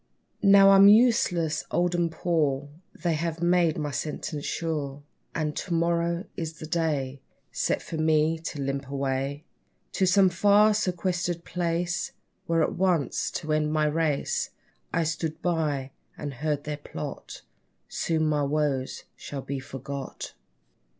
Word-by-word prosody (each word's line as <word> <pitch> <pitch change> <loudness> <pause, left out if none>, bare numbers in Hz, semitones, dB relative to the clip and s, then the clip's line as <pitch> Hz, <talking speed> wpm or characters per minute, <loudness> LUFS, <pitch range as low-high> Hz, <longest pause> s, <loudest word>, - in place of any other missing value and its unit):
Now 195 -1 +7
I'm 195 0 +8
useless, 205 -8 +4
old, 175 0 +1
and 170 -1 +1
poor, 150 -5 0 0.3
They 175 -2 -1
have 165 +1 -2
made 175 -1 +3
my 150 -2 -2
sentence 150 +1 -4
sure; 145 -4 -3 0.3
And 150 -1 -1
to 175 - -2
morrow 170 +2 +1
is 160 -1 -4
the 155 - -9
day, 150 -5 -1 0.3
Set - - -1
for 165 - -5
me 155 0 +2
to 155 -2 -6
limp 135 0 -2
away, 140 +1 -2 0.5
To 190 - +1
some 190 0 +5
far, 205 +4 +5
sequestered 175 -3 -1
place, 175 0 -1 0.4
There 165 -1 +3
at - - 0
once 175 -5 +1
to 155 0 -3
end 150 0 +1
my 155 0 +2
race. 150 -1 0 0.4
I 165 - +1
stood 160 0 -2
by, 150 -6 0 0.3
and 145 -2 -5
heard 150 +2 -2
their 150 0 -4
plot 145 - -7 0.4
Soon 160 -1 0
my 150 -1 +1
woes 140 -2 -1
shall 140 -2 -7
be 140 0 -4
forgot! 135 0 -7
160 Hz, 140 wpm, -27 LUFS, 145-175 Hz, 0.5 s, I'm